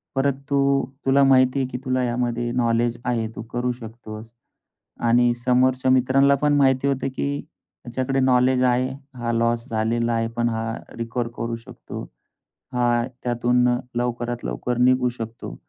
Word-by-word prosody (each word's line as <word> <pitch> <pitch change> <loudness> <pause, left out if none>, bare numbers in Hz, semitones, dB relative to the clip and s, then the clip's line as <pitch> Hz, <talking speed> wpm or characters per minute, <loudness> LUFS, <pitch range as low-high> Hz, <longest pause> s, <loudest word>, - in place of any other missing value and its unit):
परत 135 0 +2 0.2
तू 140 0 +2 0.2
तुला 135 +1 +4
माहिती 130 0 +4
आहे, 130 - 0
की 125 - -5
तुला 130 0 +1
यामध्ये 120 -1 -1
नॉलेज 120 -1 +1
आहे. 115 -2 0
तू - - -5
करू 125 +1 0
शकतोस 115 -1 -9 0.8
आणि 120 0 +4
समोरच्या 130 +1 +3
मित्रांना 135 +2 +4
पण 145 +1 +1
माहिती 135 0 +3
होतं, 135 -1 0
की 140 +1 -1 0.5
ह्याच्याकडे 130 +2 -1
नॉलेज 130 0 +3
आहे. 125 +1 +2 0.3
हा 120 -1 -2
लॉस 115 +1 0
झालेला 115 +1 0
आहे 115 0 0
पण 120 0 +2
हा 115 0 -2 0.2
रिकव्हर 115 +1 -2
करू 115 0 -2
शकतो. 115 - -9 0.7
हा 120 -1 +2 0.2
त्यातून 125 0 +2 0.3
लवकरात 120 0 -2
लवकर 125 -1 -2
निघू 125 0 +3
शकतो. 115 - -7
125 Hz, 145 wpm, -23 LUFS, 120-130 Hz, 0.8 s, तुला